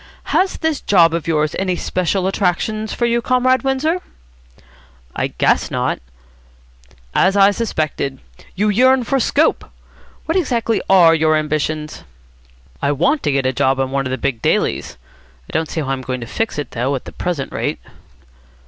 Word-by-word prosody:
"Has 380 0 +2
this 320 -3 -1
job 170 -5 +4
of 170 -1 -3
yours 155 -2 0
any 185 -1 0
special 185 +1 -1
attractions 205 +3 -1
for 240 - -1
you, 235 0 +1
Comrade 255 +1 +2
Windsor?" 280 +6 0 1.1
"I - - 0
guess - - +1
not." - - -1 1.1
"As 195 +2 +3
I 200 0 +6
suspected. 155 - -2 0.4
You 210 +3 +1
yearn 255 +4 +4
for 270 +3 0
scope. 290 +5 +1 0.6
What 325 - -1
exactly 235 - 0
are 175 -4 +7
your 155 -1 +3
ambitions?" 155 0 -2 0.8
"I 140 - +1
want 275 - +1
to 145 - 0
get 135 -1 0
a 130 - +1
job 135 0 +1
on 135 0 -1
one 135 -1 -1
of - - -5
the 130 - -2
big 125 -3 -2
dailies. - - 0 0.5
I - - -13
don't 160 0 -1
see 160 - -2
how 135 - -4
I'm 135 -1 -2
going 130 -1 -4
to - - -5
fix 225 - -3
it, 145 - -4
though, 130 +4 -1
at 130 - -6
the - - -8
present 170 -7 -4
rate." - - -2
175 Hz, 170 wpm, -18 LUFS, 140-235 Hz, 1.1 s, are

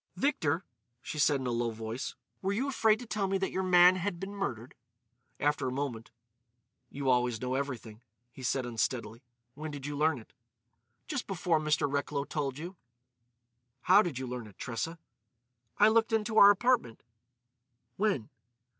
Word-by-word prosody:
"Victor," 180 - 0 0.4
she 155 - -5
said 145 -1 +4
in - - -4
a 125 - -1
low 120 0 0
voice, 110 +2 -5 0.3
"were 195 - 0
you 240 +8 -1
afraid 220 -5 +3
to 245 - -9
tell 210 -3 -1
me 195 0 +1
that 190 0 -2
your 190 - -1
man 180 0 +6
had 185 -1 -3
been 195 +2 -6
murdered?" 130 - -4 0.7
After 145 -2 +1
a - - -1
moment: 130 -4 -4 0.8
"You 140 -1 -5
always 125 -2 +2
know 125 +1 -2
everything," 125 -5 -4 0.3
he 130 - -12
said 130 0 0
unsteadily. 115 0 -2 0.3
"When 155 +4 -6
did 145 -2 -7
you 145 0 -4
learn 155 +1 +2
it?" 110 - -14 0.7
"Just 285 -5 -3
before 175 -4 +1
Mr. 150 -2 +1
Recklow 140 0 -1
told 140 -2 -3
you." 175 +4 -7 1.0
"How 190 +8 +6
did 170 -10 -3
you 130 - -3
learn 125 -3 -5
it, 100 - -16
Tressa?" 125 +8 -4 0.8
"I 210 - +7
looked 225 +1 +3
into 220 0 +2
our 200 - +10
apartment." 205 - +2 0.9
"When?" 195 - 0
145 Hz, 165 wpm, -31 LUFS, 125-195 Hz, 1.0 s, our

